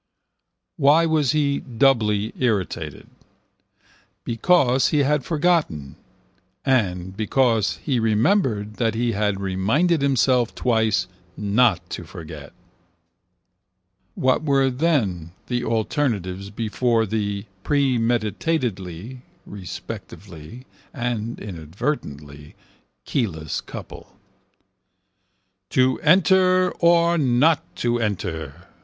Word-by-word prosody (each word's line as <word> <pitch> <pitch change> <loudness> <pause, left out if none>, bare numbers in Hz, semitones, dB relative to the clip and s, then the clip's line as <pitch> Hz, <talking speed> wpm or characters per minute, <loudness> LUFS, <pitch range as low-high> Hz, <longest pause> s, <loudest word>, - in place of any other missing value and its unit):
Why 150 +4 +5
was 155 -5 +2
he 145 -2 +1
doubly 115 -4 +1
irritated? 95 - -2 1.2
Because 130 +1 +2
he 150 -2 +2
had 145 0 +1
forgotten 150 - 0 0.7
and 95 -8 0
because 110 -3 +1
he 130 -4 0
remembered 110 - +1
that 115 -2 0
he 120 +1 0
had 105 -2 -1
reminded 110 - +1
himself 130 -3 +2
twice 110 -6 +1 0.3
not 100 -3 +2
to - - -5
forget. 80 -4 -10 1.6
What 130 +1 +2
were 135 -3 +2
then 115 - 0
the 120 -1 -2
alternatives 105 - -1
before 115 +2 0
the, 100 -1 -3 0.2
premeditatedly 120 - -1 0.2
(respectively) 95 +2 -9 0.3
and 120 -1 -3
inadvertently, 80 - -6 0.5
keyless 80 - -2
couple? - - -11 1.5
To 130 0 +2
enter 185 +2 +4
or 170 0 +4
not 140 +3 +2
to 120 0 +1
enter. 85 -7 -4
115 Hz, 85 wpm, -22 LUFS, 100-140 Hz, 1.6 s, Why